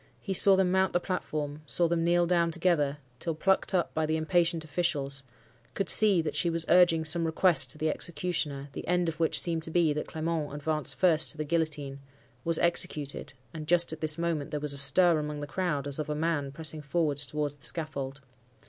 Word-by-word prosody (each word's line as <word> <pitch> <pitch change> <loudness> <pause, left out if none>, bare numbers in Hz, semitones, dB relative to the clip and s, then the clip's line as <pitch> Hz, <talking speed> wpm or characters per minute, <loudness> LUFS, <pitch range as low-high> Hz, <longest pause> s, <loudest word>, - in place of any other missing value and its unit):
He 195 - -5
saw 195 +1 +8
them 190 -1 +1
mount 190 0 +1
the 175 - +2
platform; 155 -5 -5
saw 170 +4 +1
them 165 0 -1
kneel 175 +1 +2
down 170 -1 +1
together 165 -4 0 0.2
till 165 -2 -4
plucked 190 +3 0
up 175 - -1
by 160 -1 -1
the 160 +1 -1
impatient 165 0 0
officials; 140 -4 -2 0.5
could 195 -3 -3
see 200 -6 +6
that 155 - -5
she 170 - +1
was 165 0 -1
urging 170 -3 +4
some 165 +2 +2
request 165 +2 +2
to - - +2
the 155 +1 -2
executioner; 150 -5 -3
the - - -8
end 180 0 0
of 160 0 -8
which 165 - +3
seemed 165 -2 0
to 165 - -7
be, 160 -2 +1
that 150 - -5
Clement 160 -2 -4
advanced 150 -1 +3
first 160 -4 +2
to - - 0
the 155 - -3
guillotine, 150 -4 -2 0.4
was 165 -1 +6
executed 150 -5 0 0.2
(and 155 -2 -8
just 170 0 +2
at 160 - -10
this 155 0 +1
moment 165 -4 -3
there 150 - -4
was 150 -1 0
a - - -2
stir 160 +4 +3
among 150 0 -5
the 145 - -5
crowd, 150 -3 -3
as 145 +1 -3
of 155 - -4
a 150 - -2
man 150 -3 -2
pressing 155 +1 -2
forward 150 -1 -2
towards 145 +1 -3
the 140 - -9
scaffold). 140 -4 -6
160 Hz, 210 wpm, -28 LUFS, 150-170 Hz, 0.5 s, saw